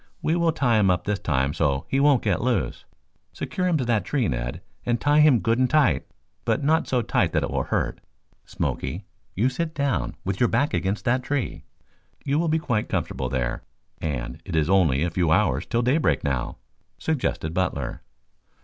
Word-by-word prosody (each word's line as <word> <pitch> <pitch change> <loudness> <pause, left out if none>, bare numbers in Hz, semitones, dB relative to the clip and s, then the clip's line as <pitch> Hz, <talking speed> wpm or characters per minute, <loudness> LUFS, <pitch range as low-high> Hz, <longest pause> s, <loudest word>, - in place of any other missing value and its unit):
We 160 - +2
will 170 -1 +2
tie 120 -8 +2
him 100 -2 +4
up 90 -1 +1
this 105 0 -1
time 70 -3 0
so 70 -4 0
he 135 - 0
won't 140 -3 +4
get 100 -5 +1
loose. 120 - -1 0.5
Secure 185 -1 -2
him 175 -3 +2
to 130 - -1
that 115 -5 +1
tree, 130 +1 0
Ned, - - -3 0.2
and 120 0 0
tie 145 +1 +3
him 150 -6 +6
good 115 +2 +1
and 130 -1 +3
tight, 145 - +3 0.4
but - - 0
not 160 +3 +2
so 125 -2 +1
tightly - - +1
that - - +1
it - - -2
will - - -1
hurt. - - -2 0.4
Smoky, 95 +3 -3 0.3
you 110 +7 +2
sit 160 +5 -3
down 135 - -1
with 95 0 -2
your 120 - +3
back 140 +6 +1
against 95 +2 -1
that 125 +1 +2
tree. 140 0 -3 0.6
You 145 +2 +1
will 170 -1 +1
be 160 - +3
quite 120 -10 -1
comfortable 65 -1 -2
there 60 -3 -2 0.4
and 65 -7 -4
it - - -5
is 80 +2 +2
only 80 -7 +3
a 85 - -1
few 85 -1 +1
hours 80 - +2
till 120 +1 0
daybreak 140 +6 +2
now," 65 -5 -2 0.4
suggested 125 - -2
Butler. 85 -8 -2
115 Hz, 195 wpm, -24 LUFS, -, 0.6 s, him